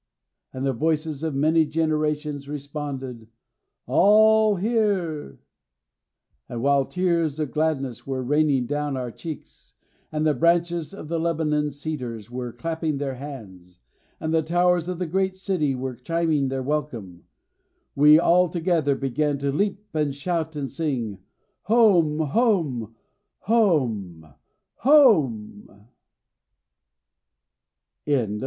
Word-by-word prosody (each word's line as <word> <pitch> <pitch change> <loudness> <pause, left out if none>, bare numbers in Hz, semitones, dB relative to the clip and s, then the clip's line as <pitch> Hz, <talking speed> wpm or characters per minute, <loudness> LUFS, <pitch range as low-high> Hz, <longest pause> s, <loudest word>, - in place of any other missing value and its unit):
And 130 +1 -4
the 135 - +1
voices 155 +1 -1
of 160 -3 -2
many 160 +3 +3
generations 150 -2 -1
responded, 140 -5 -6 0.6
'All 215 - +5
here!' 190 - -1 1.1
And 120 0 -5
while 140 -1 +3
tears 170 -4 0
of 150 -4 -2
gladness 140 -6 -2
were 130 -1 -2
raining 145 -1 +2
down 145 +1 -2
our 125 -2 -4
cheeks, 160 +4 -10 0.4
and 155 0 -1
the 155 - +3
branches 170 +1 +1
of 195 -6 -9
the 165 +1 -2
Lebanon 155 -3 0
cedars 130 -7 -6
were 125 -1 -5
clapping 160 +4 -3
their 140 -1 -3
hands, 105 - -10 0.4
and 160 0 -2
the 160 - +3
towers 175 +1 +1
of 180 -1 -3
the 180 - -2
great 190 +3 -1
city 185 -8 -1
were 130 0 -4
chiming 155 +2 0
their 130 0 -3
welcome, 125 - -4 0.7
we 150 +2 +7
all 175 +2 +4
together 165 -4 0
began 140 +2 -1
to 140 0 -1
leap 200 +6 -1
and 150 -3 -1
shout 160 +1 -3
and 140 -3 -4
sing, 125 -10 -3 0.5
'Home, 190 -8 +4
home, 150 - 0 0.5
home, 115 - 0 0.4
home!'" 130 - +2
150 Hz, 115 wpm, -24 LUFS, 135-170 Hz, 1.1 s, we